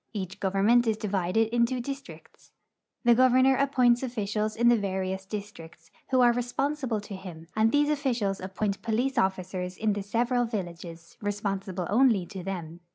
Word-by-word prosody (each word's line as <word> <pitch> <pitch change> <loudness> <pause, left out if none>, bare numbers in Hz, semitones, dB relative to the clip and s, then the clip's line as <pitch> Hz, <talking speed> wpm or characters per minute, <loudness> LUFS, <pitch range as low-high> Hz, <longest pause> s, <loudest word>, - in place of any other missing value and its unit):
Each 190 -1 -5
government 205 +5 +3
is 220 -1 +1
divided 210 +2 0
into 240 +1 +2
dis 275 +3 -4
tricts. - - -15 0.5
The 240 -1 +6
governor 255 +2 +5
appoints 255 -3 +3
officials 215 -4 -2
in 235 +1 +2
the 240 - +6
various 190 -2 -3
districts, 180 -6 -9 0.2
who 260 -1 +3
are 240 -1 +6
responsible 245 0 -1
to 205 -1 -8
him, 180 -4 -9
and 220 +1 +3
these 290 0 +3
officials 240 -9 -1
appoint 195 +2 -3
jDolice 245 +3 0
officers 185 -2 -2
in 215 -1 +1
the 205 - -3
several 240 +4 0
villages, 170 -6 -7
responsible 195 -3 -3
only 225 -5 +4
to 190 +1 -8
them. 175 -3 -6
210 Hz, 160 wpm, -27 LUFS, 190-245 Hz, 0.5 s, The